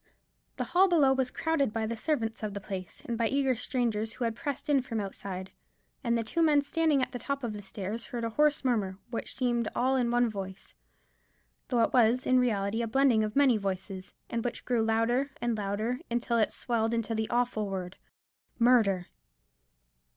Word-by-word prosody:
The - - -1
hall 375 +2 +4
below 300 -7 +4
was 265 -1 0
crowded 305 -6 0
by 225 0 -1
the 230 +1 -2
servants 230 -3 -1
of 210 -2 -4
the - - -2
place, 190 -2 -7
and 235 - -2
by 230 - +3
eager 270 +1 +2
strangers 230 -2 -1
who - - -4
had 230 -1 -1
pressed 280 +2 -4
in 285 -3 +3
from 235 -3 -4
outside; 190 -2 -5 0.5
and 235 0 +2
the 230 - -1
two 335 +10 -1
men 300 -3 +4
standing 305 -2 +2
at - - -2
the 245 - -5
top 280 +2 -3
of 230 -3 -2
the 205 - -6
stairs 205 +3 -5
heard 240 -1 -5
a 230 - -2
hoarse 295 +3 +2
murmur; 205 -7 0
which 230 - -3
seemed 240 -3 0
all 260 +2 +2
in 245 -2 +1
one 240 0 +3
voice, 195 -3 -7 0.9
though 240 -3 +2
it - - 0
was 245 0 +4
in 255 0 +4
reality 220 -2 0
a 230 - -1
blending 245 -2 +3
of 215 0 -3
many 275 -5 +5
voices; 190 -1 -5
and 230 -1 -2
which 245 -1 -4
grew 245 -2 +1
louder 230 +5 +1
and 240 -1 0
louder, 215 +4 -2
until 235 0 0
it 215 - +2
swelled 230 -1 0
into 230 0 -1
the 220 0 -1
awful 240 -4 0
word 185 -1 -5 0.6
"Murder!" 225 -7 +4
235 Hz, 195 wpm, -29 LUFS, 215-255 Hz, 0.9 s, many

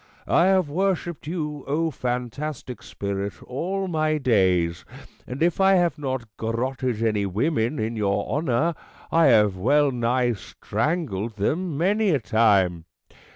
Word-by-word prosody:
I 170 - +3
have 190 -3 +3
worshipped 175 -1 -2
you, 150 -4 -4
O 160 +3 0
fantastic 125 +1 -4
Spirit, 100 0 -4
all 190 +9 -3
my 155 -2 0
days; 95 - +2 0.4
and 130 +5 -2
if 175 +2 +1
I 195 0 +5
have 175 -3 +1
not 130 -3 -2
gar 115 0 -3
rotted 125 -1 -2
any 105 -3 +1
women 115 - 0
in 110 +2 -2
your 100 -1 0
honour, 150 +2 0 0.4
I 165 -2 +5
have 105 -6 +4
well 145 +8 +3
nigh 120 0 +1
strangled 115 - -3
them 155 - -1
many 205 +6 +2
a 150 -6 +2
time. 100 -7 +2
130 Hz, 140 wpm, -24 LUFS, 110-160 Hz, 0.4 s, I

